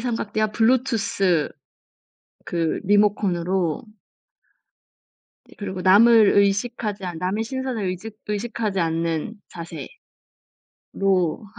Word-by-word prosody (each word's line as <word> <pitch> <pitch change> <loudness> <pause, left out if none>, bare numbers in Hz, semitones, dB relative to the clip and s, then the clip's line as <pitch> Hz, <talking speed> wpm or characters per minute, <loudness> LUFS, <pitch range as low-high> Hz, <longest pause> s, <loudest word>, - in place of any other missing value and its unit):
삼각대와 215 -3 -2
블루투스 225 - +1 1.0
그 165 -2 -1
리모컨으로 190 -4 +1 1.7
예 - - -16
그리고 190 -2 -5
남을 215 +3 +6
의식하지 205 0 0
않 175 -3 -5
남의 195 +6 -1
시선을 260 -3 -3
의직 190 +4 -5
의식하지 210 -2 -2
않는 165 +3 -1 1.4
자세로 190 -1 -1
200 Hz, 210 characters per minute, -23 LUFS, 185-225 Hz, 1.7 s, 남을